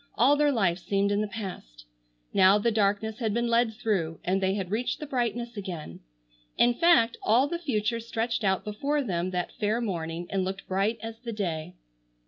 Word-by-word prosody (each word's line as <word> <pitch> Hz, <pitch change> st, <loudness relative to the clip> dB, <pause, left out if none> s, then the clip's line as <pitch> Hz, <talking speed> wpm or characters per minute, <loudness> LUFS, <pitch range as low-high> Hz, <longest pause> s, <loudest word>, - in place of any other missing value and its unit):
All 265 Hz, +5 st, +5 dB
their 295 Hz, 0 st, +3 dB
life 190 Hz, -8 st, +1 dB
seemed 200 Hz, +2 st, 0 dB
in 205 Hz, +1 st, +1 dB
the 215 Hz, -, -1 dB
past. 180 Hz, -, -8 dB, 0.5 s
Now 190 Hz, +2 st, +6 dB
the 230 Hz, +3 st, +1 dB
darkness 215 Hz, +1 st, 0 dB
had 220 Hz, -3 st, -1 dB
been 235 Hz, 0 st, +1 dB
led 235 Hz, -1 st, +2 dB
through, 180 Hz, -8 st, -1 dB
and 190 Hz, +2 st, 0 dB
they 190 Hz, 0 st, +1 dB
had 190 Hz, -3 st, -4 dB
reached 235 Hz, +4 st, -1 dB
the 300 Hz, -, -5 dB
brightness 240 Hz, -3 st, -2 dB
again. 180 Hz, -, -6 dB, 0.6 s
In 240 Hz, 0 st, +5 dB
fact, 330 Hz, -6 st, +4 dB
all 245 Hz, +6 st, +3 dB
the 340 Hz, +3 st, -3 dB
future 230 Hz, -7 st, -1 dB
stretched 230 Hz, 0 st, -2 dB
out 190 Hz, -2 st, +1 dB
before 280 Hz, +8 st, -1 dB
them 180 Hz, -5 st, -1 dB
that 180 Hz, -1 st, -2 dB
fair 215 Hz, +2 st, +1 dB
morning 170 Hz, -6 st, -3 dB
and 195 Hz, -1 st, 0 dB
looked 190 Hz, +1 st, -5 dB
bright 200 Hz, +4 st, 0 dB
as 225 Hz, 0 st, -6 dB
the 235 Hz, -1 st, -6 dB
day. 170 Hz, -7 st, -3 dB
210 Hz, 190 wpm, -27 LUFS, 190-235 Hz, 0.6 s, Now